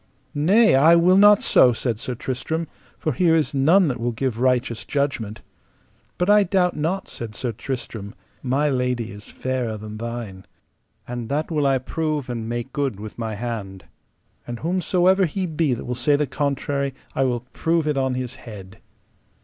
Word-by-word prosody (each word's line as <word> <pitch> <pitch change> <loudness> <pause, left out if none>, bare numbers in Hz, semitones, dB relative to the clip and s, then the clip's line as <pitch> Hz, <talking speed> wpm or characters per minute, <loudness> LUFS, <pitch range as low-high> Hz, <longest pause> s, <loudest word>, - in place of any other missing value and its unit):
Nay, 195 +10 +4
I 155 +6 +6
will 175 +2 +5
not 205 +1 +6
so, 125 - +5
said 115 -2 -2
Sir 125 - -4
Tristram, 160 +7 -3 0.3
for 155 - -1
here 165 +5 +3
is 155 -2 +1
none 160 +7 +4
that 125 -4 -2
will 120 +1 -1
give 120 0 -2
righteous 125 -3 +1
judgment. 130 -7 -2 0.7
But 180 - 0
I 210 0 +6
doubt 185 -2 +1
not, 165 +6 -2
said 110 -3 -8
Sir 125 0 -2
Tristram, 115 -2 -6 0.3
my 135 +3 +1
lady 125 -4 -1
is 105 +1 -11
fairer 125 -4 -3
than 105 0 -8
thine, 115 -5 -6 0.6
and 120 -2 -5
that 150 +4 -1
will 150 -3 +1
I 135 -1 +3
prove 150 0 -3
and 115 -2 -4
make 120 +2 -4
good 140 -8 -2
with 110 +2 -9
my 110 -2 -3
hand. 100 -4 -5 0.6
And 120 -1 -6
whosomever 185 +2 +2
he 185 +4 -2
be 155 -5 0
that - - -8
will 125 - -2
say 130 +4 +2
the 150 +1 +1
contrary 140 0 -2 0.2
I 135 - +1
will 125 -2 0
prove 165 -1 0
it 150 - +1
on 130 -1 0
his 125 -1 -4
head. 95 -4 -11
130 Hz, 175 wpm, -23 LUFS, 120-155 Hz, 0.7 s, I